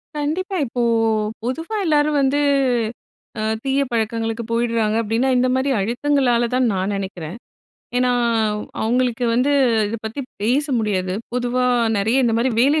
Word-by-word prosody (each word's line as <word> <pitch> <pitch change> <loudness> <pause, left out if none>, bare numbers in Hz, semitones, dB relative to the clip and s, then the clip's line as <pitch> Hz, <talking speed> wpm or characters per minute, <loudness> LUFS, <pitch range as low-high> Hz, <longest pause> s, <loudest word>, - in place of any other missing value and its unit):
கண்டிப்பா. 320 +7 -2
இப்போ 245 0 -3 0.6
பொதுவா 325 - -3
எல்லாரும் 300 -2 +2
வந்து, 275 +1 +2 1.0
அ - - -1 0.2
தீய 270 +1 +1
பழக்கங்களுக்கு 225 0 -1
போயிடுறாங்க 230 -2 +1
அப்படின்னா, 230 +4 0
இந்த 250 +1 +3
மாதிரி 265 +1 +1
அழுத்தங்களால 240 +2 +1
தான் 255 -1 +2
நான் 190 +1 -1
நெனைக்கிறேன். 190 -2 -6 0.6
ஏன்னா, 250 0 +2 0.7
அவங்களுக்கு 245 +1 0
வந்து 250 +4 +2 0.4
இத 220 +3 -3
பத்தி 225 +6 -5 0.2
பேச 255 +7 +2
முடியாது. 190 -4 -1 0.2
பொதுவா 250 0 0 0.3
நெறைய 225 +7 +2
இந்த 235 - +2
மாதிரி 240 +3 +1
வேலை 285 +5 +4
245 Hz, 130 wpm, -20 LUFS, 225-270 Hz, 1.0 s, வேலை